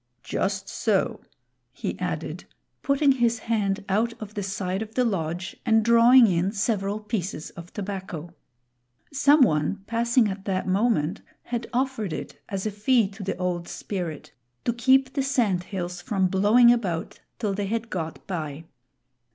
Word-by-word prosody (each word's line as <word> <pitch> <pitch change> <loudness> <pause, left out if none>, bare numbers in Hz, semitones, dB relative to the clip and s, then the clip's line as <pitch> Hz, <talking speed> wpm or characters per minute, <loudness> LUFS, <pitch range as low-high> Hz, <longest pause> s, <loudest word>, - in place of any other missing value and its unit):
Just - - -2
so," - - 0 0.5
he - - -4
added, - - -4 0.4
putting 280 0 +3
his 240 -3 +2
hand 210 -3 -1
out 220 +4 0
of 210 -1 -8
the 205 - -3
side 190 0 -2
of 220 0 -7
the 250 - +3
lodge 175 -3 -2
and 225 -2 +3
drawing 235 +2 +7
in 185 -1 +1
several 205 -1 -1
pieces 200 -7 -4
of 170 +1 -11
tobacco. 190 -5 -6 0.8
Some 285 +2 +5
one 155 +1 +1
passing 235 +1 +2
at 195 -1 -5
that 190 -2 -1
moment 195 -3 +1 0.2
had 240 -1 -4
offered 245 -7 -1
it 145 -1 -7
as 195 -2 -3
a 215 - 0
fee 215 +1 +2
to 200 +2 -11
the 195 0 -3
Old 180 -1 -2
Spirit, 175 -7 -5 0.3
to 235 - +2
keep 260 +2 +3
the 275 - 0
sand 230 -10 +1
hills 180 -3 -5
from 190 0 0
blowing 215 +6 +6
about 185 -9 -3 0.2
till 210 -4 -1
they 200 0 -2
had 230 +2 -3
got 160 -3 -4
by. 160 -4 -5
205 Hz, 155 wpm, -25 LUFS, 185-235 Hz, 0.8 s, drawing